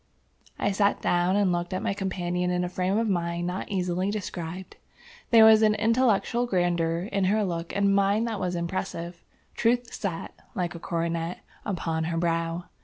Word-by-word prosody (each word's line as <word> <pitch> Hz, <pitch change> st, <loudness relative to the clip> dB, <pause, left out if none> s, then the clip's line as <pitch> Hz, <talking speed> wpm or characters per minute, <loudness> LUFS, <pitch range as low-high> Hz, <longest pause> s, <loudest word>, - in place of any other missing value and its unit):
I 205 Hz, -, 0 dB
sat 200 Hz, +1 st, +2 dB
down 175 Hz, +2 st, +2 dB
and 200 Hz, -2 st, +3 dB
looked 175 Hz, +1 st, -2 dB
at -, -, -3 dB
my -, -, 0 dB
companion 180 Hz, -2 st, -2 dB
in 180 Hz, 0 st, 0 dB
a 180 Hz, -, -2 dB
frame 185 Hz, +2 st, 0 dB
of 225 Hz, 0 st, +1 dB
mind 170 Hz, -3 st, -1 dB
not 180 Hz, +2 st, -4 dB
easily 185 Hz, 0 st, -1 dB
described. 185 Hz, -3 st, -5 dB, 0.5 s
There 225 Hz, -2 st, +8 dB
was 220 Hz, 0 st, +7 dB
an 215 Hz, -1 st, +4 dB
intellectual 230 Hz, +1 st, +2 dB
grandeur 175 Hz, -4 st, +1 dB
in 195 Hz, -1 st, +1 dB
her 210 Hz, +2 st, +2 dB
look 170 Hz, -2 st, -3 dB
and 200 Hz, 0 st, +3 dB
mien 200 Hz, +2 st, +3 dB
that 225 Hz, -3 st, -3 dB
was 180 Hz, -1 st, -2 dB
impressive. 170 Hz, 0 st, -4 dB, 0.3 s
Truth 245 Hz, +1 st, +1 dB
sat, 190 Hz, -6 st, -4 dB, 0.2 s
like 175 Hz, -3 st, -2 dB
a 170 Hz, -, -8 dB
coronet, 170 Hz, 0 st, -2 dB, 0.2 s
upon 165 Hz, -5 st, -2 dB
her 165 Hz, 0 st, -2 dB
brow. 165 Hz, 0 st, -1 dB
180 Hz, 175 wpm, -26 LUFS, 170-200 Hz, 0.5 s, There